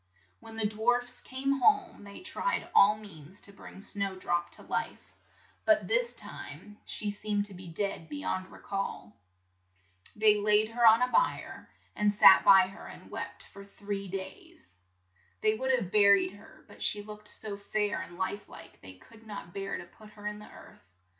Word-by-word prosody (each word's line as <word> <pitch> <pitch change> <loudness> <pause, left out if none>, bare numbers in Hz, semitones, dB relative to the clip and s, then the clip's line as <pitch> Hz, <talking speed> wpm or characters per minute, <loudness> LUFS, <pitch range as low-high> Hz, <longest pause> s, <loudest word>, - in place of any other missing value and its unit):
When 225 -1 -12
the 225 -1 -1
dwarfs 245 +4 0
came 275 +1 -2
home 400 - +3
they 200 - -11
tried - - -2
all 205 +2 +6
means 190 -4 -12
to 200 - -11
bring 195 0 -12
Snow 200 -2 -2
drop 175 -2 -1
to - - -4
life, - - -4 0.5
but - - +3
this - - +1
time 210 0 -10
she 210 -1 -3
seemed 205 0 -1
to 205 - -4
be 180 0 -10
dead 170 -1 -4
be 295 - -5
yond 185 -10 -3
re - - -12
call. 195 - -4 1.0
They 210 0 +5
laid 210 +1 +3
her 235 0 +4
on 225 +2 +7
a 250 - 0
bier, - - 0 0.3
and 210 0 +2
sat 200 -2 +8
by 195 -1 +8
her 195 +2 -11
and - - -13
wept - - -6
for 200 - -10
three 200 0 -6
days. 190 - -9 0.7
They 215 - +3
would 260 +4 -3
have 235 -9 +1
bur 200 -1 +7
ied 185 -1 -2
her, 205 - -17
but - - -16
she 205 -1 0
looked 210 0 -11
so 210 -1 -3
fair 205 +1 -1
and 175 - -10
life 195 +2 -3
like - - -13
they 95 -1 -10
could 225 - -18
not 200 -5 -8
bear 195 0 -4
to - - -8
put 215 +4 -17
her 205 -1 -13
in 210 0 -4
the 210 - -12
earth. - - -15
205 Hz, 185 wpm, -30 LUFS, 195-220 Hz, 1.0 s, sat